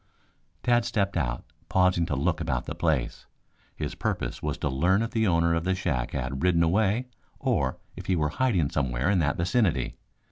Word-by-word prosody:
Tad 120 -1 +3
stepped 100 -3 -1
out, 60 -8 -1 0.3
pausing 90 -2 +3
to 70 - -1
look 80 +5 0
about - - -1
the - - -4
place. 80 -7 -1 0.5
His - - -4
purpose - - -3
was - - -2
to - - -2
learn 90 +10 +2
if 115 - -3
the 110 -1 +1
owner 85 -1 +3
of 85 0 0
the 95 +1 +1
shack 65 -10 -2
had 65 0 -3
ridden 85 -1 +3
away 105 +7 +2 0.3
or - - 0 0.2
if - - -9
he 95 - +2
were 75 -3 +1
hiding 95 - +1
somewhere 65 +6 0
in 95 - +3
that 70 -4 +1
vicinity. 85 - +1
85 Hz, 185 wpm, -27 LUFS, 70-95 Hz, 0.5 s, Tad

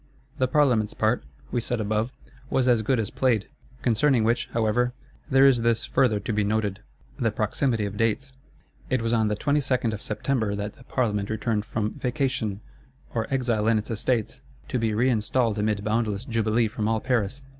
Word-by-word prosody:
The 130 - +3
Parlements 125 -6 +2
part, 110 +3 +1 0.3
we 120 - 0
said 120 +1 -2
above, 110 +3 0 0.4
was 130 -1 +1
as 120 -3 +4
good 120 +3 +1
as 110 - -2
played. 120 -6 +1 0.4
Concerning 120 +1 +3
which, 115 +2 +1
however, 115 +2 +1 0.4
there 135 +1 +6
is 130 -4 +5
this 115 0 +1
further 110 -6 +2
to 110 - -3
be 105 0 +1
noted: 105 -1 0 0.4
the 115 -3 +2
proximity 110 +1 0
of 100 0 -5
dates. 120 +4 0 0.6
It 130 -3 +1
was 115 0 0
on 110 -2 +3
the 105 - 0
22nd 130 -2 +1
of 105 - -5
September 110 -1 -1
that 100 +1 -4
the 125 - -18
Parlement 105 -7 -1
returned 110 -1 -1
from 110 -1 -2
"vacation" 125 -6 -2 0.5
or 115 +1 -2
"exile 120 -5 +1
in 115 -1 +4
its 105 +2 -4
estates;" 115 +2 -1 0.3
to 125 - 0
be 115 -1 +1
reinstalled 115 -1 +1
amid 105 -1 0
boundless 110 0 -1
jubilee 115 -2 +1
from 110 0 -2
all 110 0 +1
Paris. 125 +1 -1
115 Hz, 175 wpm, -25 LUFS, 105-125 Hz, 0.6 s, there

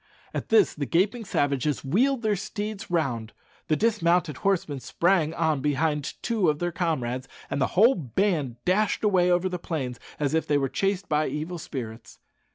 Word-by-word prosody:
At - - -4
this 220 -3 +5
the 145 -3 -4
gaping 210 - +1
savages 145 -5 0
wheeled 245 - +2
their 215 -1 +2
steeds 205 +1 -5
round, 125 -10 -1 0.3
the 155 - +3
dismounted 175 - +2
horsemen 170 -8 0
sprang 170 +2 +1
on 160 -4 +1
behind 150 +1 0
two 220 -8 +2
of 150 - +1
their 175 +2 -2
comrades, 130 -7 -2 0.2
and 140 - -1
the 130 - +3
whole 230 +7 +7
band 155 - -1
dashed 205 +5 +1
away 185 -4 +3
over 180 +1 +2
the 180 -1 -3
plains 135 -8 -4 0.2
as 145 -1 0
if 160 - +1
they 145 - +3
were 135 -1 0
chased 195 +3 -1
by 150 0 +1
evil 165 +4 -4
spirits. 115 -7 -7
165 Hz, 170 wpm, -26 LUFS, 145-195 Hz, 0.3 s, whole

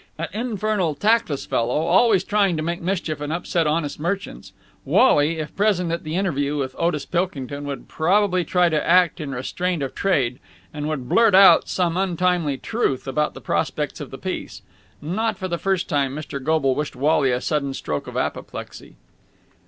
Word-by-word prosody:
An 165 0 -4
infernal, 215 -7 -1
tactless 205 -5 +1
fellow, 120 +6 0
always 190 +4 +4
trying 200 -4 +1
to 155 - -2
make 170 +2 -3
mischief 170 -4 -2
and 150 0 -3
upset 170 -1 0
honest 150 -1 -1
merchants, 185 +5 -4 0.3
Wally, 160 - +3
if 155 -2 -6
present 195 -4 +1
at 170 - -3
the 155 0 -4
interview 150 -6 0
with 130 -2 -3
Otis 165 -4 0
Pilkington, 145 -6 -3
would 140 -1 -6
probably 185 +2 +2
try 180 +2 +2
to 155 -3 0
act 175 -2 +3
in 150 - -5
restraint 150 +6 -2
of 135 - -4
trade 135 -11 0 0.3
and 150 0 -3
would 135 -5 -4
blurt 225 - +4
out 195 0 +7
some 175 -2 0
untimely 180 -5 0
truth 140 - -2
about 150 +3 -1
the - - -9
prospects - - -2
of - - -7
the - - -8
piece. - - -6 0.4
Not 210 +7 -1
for 185 - -4
the 170 -2 -3
first 190 -2 0
time, 140 -4 0
Mr. 140 -3 -6
Goble 150 -3 +2
wished 150 +1 -3
Wally 140 0 +2
a 125 - 0
sudden 140 -1 -1
stroke 75 - -4
of - - -6
apoplexy. - - -5
165 Hz, 175 wpm, -22 LUFS, 145-185 Hz, 0.4 s, out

